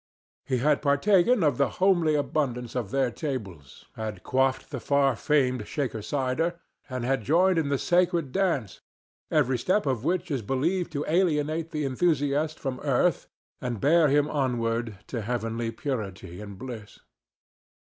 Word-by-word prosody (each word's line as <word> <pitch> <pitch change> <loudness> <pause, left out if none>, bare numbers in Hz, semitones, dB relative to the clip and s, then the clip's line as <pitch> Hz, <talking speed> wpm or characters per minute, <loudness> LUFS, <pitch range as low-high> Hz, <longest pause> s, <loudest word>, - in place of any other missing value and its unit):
He 130 - +1
had 145 +4 +2
partaken 185 - +3
of 145 -2 +2
the 140 - +3
homely 175 -5 +3
abundance 130 -5 -1
of 120 -6 -2
their 135 0 +1
tables, 100 - -6
had 110 -4 -5
quaffed 130 +2 0
the 135 - -4
far 140 0 +2
famed 130 -5 +1
Shaker 125 -7 -3
cider, 145 +8 -1 0.3
and 130 -2 -3
had 135 -1 +1
joined 170 - +3
in 150 -3 -1
the 140 - +1
sacred 175 -3 +1
dance 165 - -1 0.5
every 130 -5 +2
step 190 - +1
of 130 -5 -1
which 180 +1 -1
is 135 -4 -1
believed 160 - -1
to 145 0 -2
alienate 160 -2 +1
the 150 -2 -2
enthusiast 145 +1 +1
from 130 -3 -4
earth 145 +3 +1 0.3
and 120 -4 -3
bear 160 +5 +4
him 145 +1 +3
onward 115 -6 -1
to 120 - -4
heavenly 115 0 -2
purity 105 - -5
and 100 -2 -9
bliss. 110 -2 -8
135 Hz, 150 wpm, -27 LUFS, 120-155 Hz, 0.5 s, bear